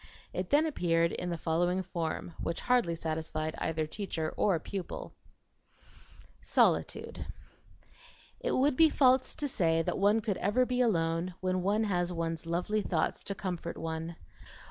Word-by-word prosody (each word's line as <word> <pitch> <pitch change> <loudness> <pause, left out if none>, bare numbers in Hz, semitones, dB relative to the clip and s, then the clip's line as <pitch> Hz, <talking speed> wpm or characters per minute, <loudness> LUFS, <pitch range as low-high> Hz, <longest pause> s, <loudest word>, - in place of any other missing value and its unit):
It 185 0 -3
then 295 +2 +4
appeared 170 - +2
in 180 - -3
the 170 - -2
following 175 +3 +1
form, 170 -1 -3
which 165 - -2
hardly 245 -9 +2
satisfied 160 -1 -3
either 160 -1 -1
teacher 160 -2 -4
or 195 -5 +3
pupil: 195 - -6 1.3
SOLITUDE - - +1 1.1
It - - -1
would 270 +1 +3
be 320 +3 +6
false 260 -3 +3
to 290 - -2
say 165 -9 +2
that - - -2
one 205 +3 +4
could 205 -3 -1
ever 210 +7 +2
be 250 0 0
alone 170 -5 +1
when 185 0 0
one 205 +4 +2
has 180 -4 0
one's 165 -1 -3
lovely 180 +6 0
thoughts - - -1
to 200 - -3
comfort 180 -3 -4
one. 165 +1 -4
180 Hz, 145 wpm, -31 LUFS, 165-215 Hz, 1.3 s, be